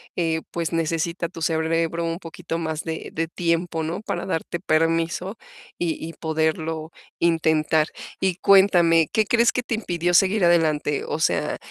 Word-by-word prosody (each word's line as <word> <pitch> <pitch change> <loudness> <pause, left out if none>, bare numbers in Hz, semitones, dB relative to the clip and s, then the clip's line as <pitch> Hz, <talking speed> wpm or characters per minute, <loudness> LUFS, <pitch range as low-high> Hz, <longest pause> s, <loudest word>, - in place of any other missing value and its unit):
eh, 165 -2 0
pues 170 0 -3
necesita 165 +1 -1
tu 165 - -10
cerebro 165 +1 0
un 165 +1 -3
poquito 165 -1 -6
más 160 -1 -3
de 160 -1 -5
de 165 +1 -1
tiempo, 170 0 -1
¿no? 165 +5 -3
Para - - -4
darte 170 -1 -3
permiso 165 +4 0 0.4
y 170 -2 -1
y 165 - -8
poderlo 160 0 -2 0.3
intentar. 160 -2 +2 0.3
Y 190 -2 +1
cuéntame, 175 -5 +5
¿qué 220 - +2
crees 235 +2 +3
que 250 - -2
te 240 - -3
impidió 175 -5 -1
seguir 190 +2 +4
adelante? 155 -4 +2
O - - -2
sea, 155 - 0
165 Hz, 155 wpm, -23 LUFS, 160-175 Hz, 0.4 s, cuéntame